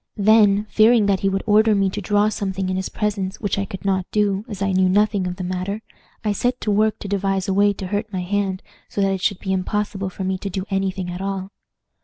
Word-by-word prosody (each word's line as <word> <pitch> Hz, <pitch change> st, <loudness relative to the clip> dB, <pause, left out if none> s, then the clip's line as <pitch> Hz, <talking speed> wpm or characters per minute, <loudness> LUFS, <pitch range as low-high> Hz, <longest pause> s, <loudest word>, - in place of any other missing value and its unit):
Then, 210 Hz, -1 st, +5 dB
fearing 220 Hz, +1 st, +4 dB
that 200 Hz, -2 st, +2 dB
he 195 Hz, -, +1 dB
would 195 Hz, 0 st, -1 dB
order 215 Hz, 0 st, +4 dB
me 195 Hz, -1 st, +2 dB
to -, -, -4 dB
draw 205 Hz, 0 st, +2 dB
something 195 Hz, -3 st, -3 dB
in 185 Hz, -, -1 dB
his 190 Hz, 0 st, -2 dB
presence, 200 Hz, -2 st, -2 dB
which 200 Hz, -1 st, -1 dB
I 200 Hz, -, -1 dB
could 195 Hz, +1 st, -8 dB
not 190 Hz, -2 st, 0 dB
do, 205 Hz, -1 st, +1 dB
as 205 Hz, -5 st, -7 dB
I 195 Hz, 0 st, 0 dB
knew 185 Hz, 0 st, +3 dB
nothing 205 Hz, -1 st, +2 dB
of 180 Hz, -, -4 dB
the 185 Hz, -, -6 dB
matter, 185 Hz, +4 st, -3 dB, 0.4 s
I 210 Hz, -, +2 dB
set 245 Hz, +5 st, 0 dB
to 210 Hz, -, 0 dB
work 215 Hz, +1 st, +2 dB
to -, -, -5 dB
devise 195 Hz, -1 st, -1 dB
a 195 Hz, -, +1 dB
way 205 Hz, +1 st, +4 dB
to 195 Hz, -, -7 dB
hurt 205 Hz, +3 st, -3 dB
my 185 Hz, -2 st, -3 dB
hand 195 Hz, 0 st, -1 dB, 0.3 s
so 200 Hz, -, -2 dB
that 195 Hz, 0 st, +2 dB
it 190 Hz, -, -3 dB
should 200 Hz, 0 st, +1 dB
be 190 Hz, 0 st, -2 dB
impossible 195 Hz, +1 st, -2 dB
for 190 Hz, -, -6 dB
me 190 Hz, 0 st, -1 dB
to 200 Hz, -, -4 dB
do 190 Hz, 0 st, -4 dB
any 195 Hz, 0 st, +1 dB
thing 185 Hz, -1 st, -5 dB
at 180 Hz, +1 st, -6 dB
all. 195 Hz, 0 st, -3 dB
195 Hz, 255 wpm, -21 LUFS, 190-210 Hz, 0.4 s, Then